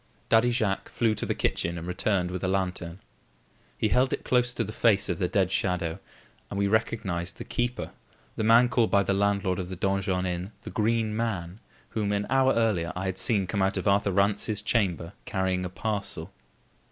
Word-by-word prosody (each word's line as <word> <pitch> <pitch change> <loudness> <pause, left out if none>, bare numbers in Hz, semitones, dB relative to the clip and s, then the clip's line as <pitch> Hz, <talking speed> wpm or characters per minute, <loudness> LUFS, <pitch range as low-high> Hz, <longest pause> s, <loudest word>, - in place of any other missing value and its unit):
Daddy 115 +2 +5
Jacques 110 -5 0
flew 115 -2 +1
to - - -3
the - - 0
kitchen 85 +1 -1
and 85 - -6
returned 90 0 0
with 90 -1 -4
a - - +1
lantern. 90 -2 -2 0.8
He 110 - +1
held 130 +4 +3
it - - -2
close 125 -1 +2
to 120 -2 -2
the 105 - -6
face 105 -4 +3
of 90 - -1
the 90 - +1
dead 95 0 +1
shadow, 90 -4 0 0.5
and 100 - -5
we 100 - +2
recognised 100 -4 -1
the - - -6
keeper, 120 +1 -2 0.4
the - - -2
man 115 +3 +6
called 120 -2 +2
by 100 0 +4
the 100 - 0
landlord 100 -2 +1
of 90 -1 -4
the 95 - -5
Donjon 95 0 0
Inn 90 +3 -3
the - - -7
Green 110 0 0
Man, 100 -5 -3 0.3
whom, 105 -2 -1
an 100 0 0
hour 135 0 +4
earlier, 105 -8 +1
I 90 +1 -3
had 95 0 -2
seen 100 -5 +2
come 100 +2 -2
out 95 +1 +1
of 95 - -2
Arthur 100 0 +3
Rance's 100 +2 +1
chamber 95 -6 0
carrying 95 -2 -1
a - - -3
parcel. 100 -3 -3
100 Hz, 200 wpm, -27 LUFS, 90-110 Hz, 0.8 s, man